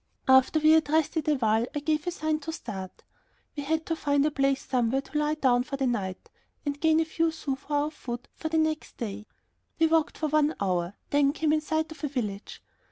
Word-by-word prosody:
After 265 +3 +5
we 310 0 +5
had 315 -2 +4
rested 315 0 +1
a 300 - +4
while 225 -2 +1
I - - +1
gave 305 +1 0
the - - 0
sign 310 -3 -1
to 320 +2 -5
start. 195 - -7 0.5
We 290 - -3
had 320 +3 -1
to 330 - -1
find 285 -2 +1
a 305 - +1
place 275 -1 +1
somewhere 255 +1 +1
to 290 - -18
lie 300 +1 +1
down 255 -5 +3
for 275 +2 -5
the 270 - 0
night 195 -7 -3 0.3
and 285 0 -3
gain 320 -1 +4
a 325 - +2
few 330 +1 0
sous 280 -4 -4
for 285 - -15
our 290 +1 +1
food 245 -5 -7
for 315 - -5
the 320 - 0
next 315 0 -1
day. 210 -2 -5 0.5
We 325 - +4
walked 320 -1 +2
for 310 - -1
one 305 +1 +2
hour, 180 -1 -1 0.2
then 285 -1 +3
came 310 -1 +1
in 310 - +2
sight 315 +1 -1
of 315 -2 -11
a - - +1
village. 215 -7 -5
290 Hz, 230 wpm, -27 LUFS, 255-315 Hz, 0.5 s, After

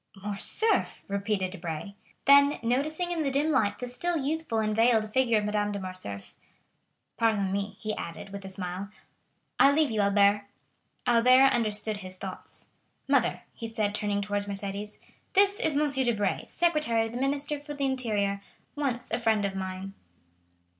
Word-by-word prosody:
"Morcerf!" 205 - -1
repeated 200 -1 -1
Debray. 175 +1 -5 0.3
Then 280 +1 +6
noticing 310 +9 0
in 340 -2 -1
the 285 - +1
dim 285 +4 +1
light 220 -8 +2
the 250 - -5
still 335 +8 0
youthful 300 -3 -2
and 215 -1 0
veiled 225 -2 +3
figure 250 -4 +3
of 210 - 0
Madame 210 0 0
de 200 - -3
Morcerf: 185 - -7 0.8
"Pardon 210 -4 +1
me," 200 0 -3
he 215 -1 -3
added 165 +3 -7
with 200 0 -7
a 190 - -7
smile, 185 +1 -5 0.7
"I 275 - +7
leave 300 -2 +2
you, 215 -1 +1
Albert." 200 0 +3 0.6
Albert 255 +3 +6
understood 215 -2 0
his 185 -2 -5
thoughts. 190 0 -8 0.4
"Mother," - - +2
he 230 - -6
said, 215 -2 -1
turning 205 -1 -1
towards 205 0 -2
Mercédès, 200 +1 -4 0.4
"this 400 +1 +4
is 315 -12 +2
M. 285 -3 +2
Debray, 210 -5 0
secretary 305 -10 +1
of 225 - -6
the 240 - -5
Minister 285 +2 0
for 295 0 -8
the 280 -1 -1
Interior, 210 -7 -1 0.3
once 270 -5 -2
a - - 0
friend 220 -3 +2
of 195 - -2
mine." 190 0 -5
215 Hz, 160 wpm, -28 LUFS, 200-270 Hz, 0.8 s, I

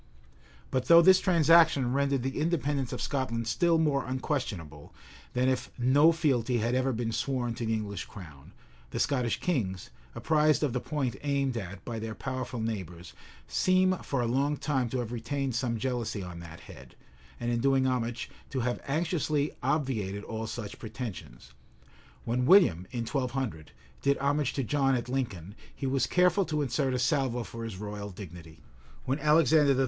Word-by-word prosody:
But 130 -1 0
though 170 0 +8
this 185 +1 +7
transaction 160 -7 +4
rendered 140 -2 +1
the 135 +2 -2
independence 145 -5 0
of - - -4
Scotland 115 -4 -2
still 170 +6 +3
more 150 -4 +2
unquestionable, 120 - -4 0.4
than 125 +1 +1
if 130 -1 0
no 140 +6 +5
fealty 130 -7 +1
had 115 +2 0
ever 130 +1 +1
been 115 -1 -2
sworn 120 +1 -1
to 115 0 -4
the 110 - +1
English 105 -3 -4
crown, 75 -8 -12 0.4
the - - -4
Scottish 125 -5 0
kings, 95 - -2 0.2
apprised 155 +5 +2
of 140 -5 0
the 125 - 0
point 135 -3 -2
aimed 140 -3 0
at 100 -4 -6
by 115 -2 -4
their 110 0 -5
powerful 130 -2 -4
neighbors, 90 -6 -5 0.3
seem 185 0 +3
for 135 -6 -2
a - - 0
long 140 +5 +1
time 135 -4 -1
to 130 - -2
have 120 -2 -3
retained 130 +3 -2
some 115 0 -1
jealousy 120 -4 -2
on 85 -1 -8
that 85 -1 -10
head, - - -13 0.4
and, 120 0 -1
in 120 - 0
doing 135 +1 +3
homage, 120 -2 -1 0.2
to 130 - -2
have 125 +1 -1
anxiously 155 -1 0
obviated 110 -9 -1
all 110 0 -5
such 105 -3 -6
pretensions. 105 - -8 0.7
When 125 +2 0
William, 95 - +5
in 120 -2 -3
1200, 125 - -3 0.3
did 140 0 +2
homage 140 0 0
to 135 - -1
John 135 +1 +2
at 120 0 -3
Lincoln, 105 -9 -3 0.2
he 140 - -5
was 135 0 +1
careful 180 +2 +3
to 150 -2 -1
insert 130 0 0
a - - +1
salvo 125 -1 +1
for 115 0 -8
his 110 -4 -6
royal 105 0 -6
dignity;[*] 85 -4 -11 0.4
when 135 +3 -1
Alexander 150 -1 +4
III. 130 - -1
130 Hz, 170 wpm, -29 LUFS, 115-140 Hz, 0.7 s, though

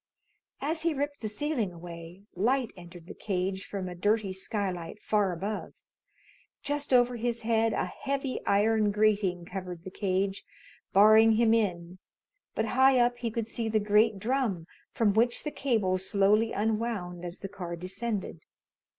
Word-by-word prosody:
As 315 +3 -1
he 330 -2 +1
ripped 285 +1 -3
the 215 - -3
ceiling 235 -3 -2
away, 170 +1 -10
light 240 +5 +1
entered 175 -1 -12
the - - -9
cage 190 -1 -3
from 195 -2 -4
a 180 - -5
dirty 205 +2 0
skylight 190 -2 -3
far 210 -3 +1
above. 195 +5 -4 0.9
Just 290 0 -2
over 245 -1 +4
his 235 0 -2
head 225 0 +2
a - - 0
heavy 275 -1 -3
iron 210 +1 +3
grating 205 -4 +1
covered 180 -2 -7
the 190 - -8
cage, 195 0 -1 0.5
barring 215 +3 +7
him 225 0 +4
in, 180 -5 -1 0.6
but 220 - 0
high 265 +1 +5
up 245 0 +3
he 235 - -2
could 225 0 -3
see 225 0 -3
the 215 0 +2
great 210 +1 +3
drum, 220 -6 -1 0.3
from 215 -3 +2
which 235 +3 +2
the 300 - -3
cable 215 -11 0
slowly 200 +4 +2
unwound 210 -5 -2
as 175 0 -6
the 195 - -4
car 175 -3 -6
descended. 190 0 -4
210 Hz, 155 wpm, -29 LUFS, 185-235 Hz, 0.9 s, barring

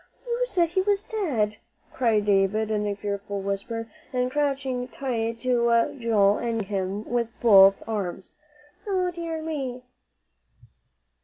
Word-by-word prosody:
"You 485 +1 0
said 345 -7 +1
he 375 +3 +1
was 405 +1 +1
dead," 250 - -1 0.4
cried 225 -5 +2
David 205 +2 +2
in 210 -1 0
a 205 - -1
fearful 200 0 -4
whisper, 200 +4 -3 0.2
and 250 -1 0
crouching 270 -3 -1
tight 230 -4 -3
to 235 -2 +2
Joel 210 -4 +3
and 230 -1 -1
gripping 200 0 -5
him 195 +2 -2
with 240 -1 0
both 195 -4 +7
arms. 190 -4 -4 0.6
"O 370 -2 0
dear 335 -2 -5
me!" 265 -6 -4
230 Hz, 135 wpm, -25 LUFS, 205-280 Hz, 0.6 s, both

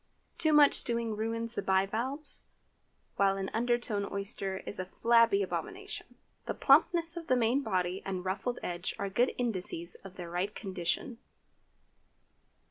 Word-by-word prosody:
Too 315 - +3
much 295 -1 +6
stewing 235 -2 +1
ruins 230 +1 -3
the 235 - -2
bivalves, 220 +10 +3 0.7
while 195 -1 +3
an 195 0 -4
underdone 230 -3 -1
oyster 195 -1 -2
is - - -1
a 185 - -2
flabby 230 -1 +3
abomination. 365 - -6 0.3
The - - -2
plumpness 330 +4 +3
of 330 - -7
the 255 - +3
main 245 +3 +2
body 185 -5 -1
and 185 -1 -4
ruffled 220 +6 -2
edge 175 0 -4
are 200 -1 -3
good 245 +6 +2
indices 185 -7 -2
of 195 -1 -11
their 175 -2 -8
right 185 +4 -2
condition. 190 +4 -3
215 Hz, 140 wpm, -31 LUFS, 190-245 Hz, 0.7 s, much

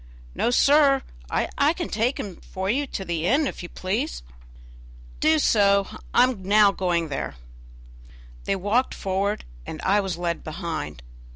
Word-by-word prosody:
"No, - - 0
sir, 275 +1 +4 0.3
I 290 +3 +1
can 345 -1 -4
take 230 +5 0
him 190 -4 -6
for 190 +1 -3
you 280 +4 0
to 195 - -5
the 170 -1 -1
inn, 290 +7 +3
if - - -4
you 175 - -7
please." 185 - -3 1.0
"Do 315 +1 +4
so, 200 -7 +4 0.3
I - - +5
am 250 -6 0
now 205 +2 +5
going 175 -4 -1
there." 135 - -4 1.1
They 195 - +1
walked 205 +7 0
forward, 195 +2 -1 0.2
and 155 - -7
I 200 +2 +3
was 195 -3 -2
led 170 -1 -2
behind. 155 - -5
200 Hz, 155 wpm, -24 LUFS, 175-250 Hz, 1.1 s, I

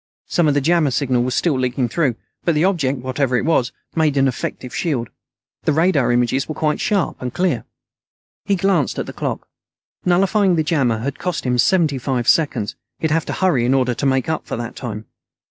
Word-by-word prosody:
Some 170 -3 +1
of 145 - +2
the 145 - +2
jammer 165 0 +3
signal 130 -1 +1
was 125 +1 -1
still 150 -7 +1
leaking 125 0 0
through, 140 -4 +1 0.3
but 170 - +1
the 155 +4 +3
object, 150 -8 +1
whatever 130 0 0
it - - -1
was, 130 -7 +2 0.2
made 155 -3 +2
an 135 0 +4
effective 125 0 -4
shield. 130 -9 -2 0.5
The 155 - +3
radar 160 -5 +3
images 120 +4 +1
were 155 - -3
quite 150 -1 0
sharp 200 -5 0
and 125 -1 -3
clear. 175 -5 0 0.8
He 200 - +1
glanced 185 -7 +1
at - - -2
the - - -8
clock. - - -4 0.6
Nullifying 190 +1 +3
the 160 - +1
jammer 140 -8 +1
had 140 +3 -4
cost 180 -2 -2
him 125 -1 0
seventy 150 +2 +3
five 125 -2 -2
seconds. 135 -10 +2 0.2
He'd 160 - -1
have 165 0 +1
to - - -2
hurry, 175 -11 +2
in 125 +3 +2
order 125 -2 +2
to 140 - -3
make 130 -1 +1
up 160 -1 -2
for - - -3
that 120 0 -5
time. 110 -4 -6
140 Hz, 205 wpm, -20 LUFS, 125-165 Hz, 0.8 s, an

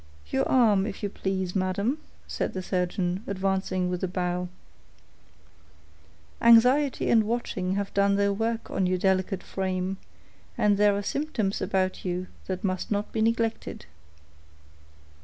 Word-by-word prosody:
"Your 135 - +1
arm, 215 -6 +4
if 210 - -7
you 205 - 0
please, 190 -1 -3
madam," 200 +9 0 0.3
said - - -2
the 185 - -4
surgeon, 180 0 -1
advancing 190 -1 -1
with 180 0 -3
a - - +2
bow. 180 0 -2 1.9
"Anxiety 250 +4 +5
and 225 -2 +5
watching 205 -5 -2
have 200 0 -3
done 200 0 +3
their 200 0 +2
work 225 +2 -2
on 185 - +1
your 185 0 +1
delicate 190 +1 0
frame, 190 0 -2 0.6
and 205 -1 +3
there 205 -1 +4
are 205 - -3
symptoms 225 -6 -2
about 185 -1 0
you 180 0 -2 0.2
that 185 -1 -3
must 185 -2 -2
not 205 0 -1
be 220 - -1
neglected." 225 0 -1
195 Hz, 140 wpm, -27 LUFS, 185-215 Hz, 1.9 s, Anxiety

